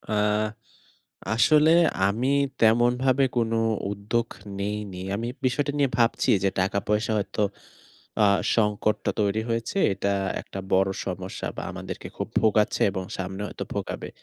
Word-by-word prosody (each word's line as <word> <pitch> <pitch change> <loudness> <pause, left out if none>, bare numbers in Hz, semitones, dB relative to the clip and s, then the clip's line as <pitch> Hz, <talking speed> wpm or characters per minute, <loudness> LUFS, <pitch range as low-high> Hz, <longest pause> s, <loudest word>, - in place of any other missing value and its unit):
আ 110 - -8 1.2
আসলে 155 +6 +5 0.4
আমি 120 +6 -1 0.3
তেমনভাবে 120 +4 +4
কোনো 115 -1 +1 0.4
উদ্যোগ 110 +4 -1 0.3
নেইনি। 100 -2 -4 0.2
আমি 115 +2 -3 0.2
বিষয়টা 140 +3 +1
নিয়ে 140 -3 +2
ভাবছি 115 0 +2
যে 95 - +3
টাকা-পয়সা 105 +3 0
হয়তো 105 +1 -2 0.8
আ - - +6 0.3
সংকটটা 105 -1 +1
তৈরি 105 +1 +1
হয়েছে। 115 - -2 0.2
এটা 100 +1 -1 0.3
একটা 95 - -9
বড় 95 +1 +4 0.2
সমস্যা 95 0 -5
বা - - -4
আমাদেরকে - - -7
খুব - - -3
ভোগাচ্ছে 105 -1 +2
এবং 95 -1 -4
সামনে 95 +1 -4
হয়তো - - -6
ভোগাবে - - -4
110 Hz, 125 wpm, -25 LUFS, 100-120 Hz, 1.2 s, আ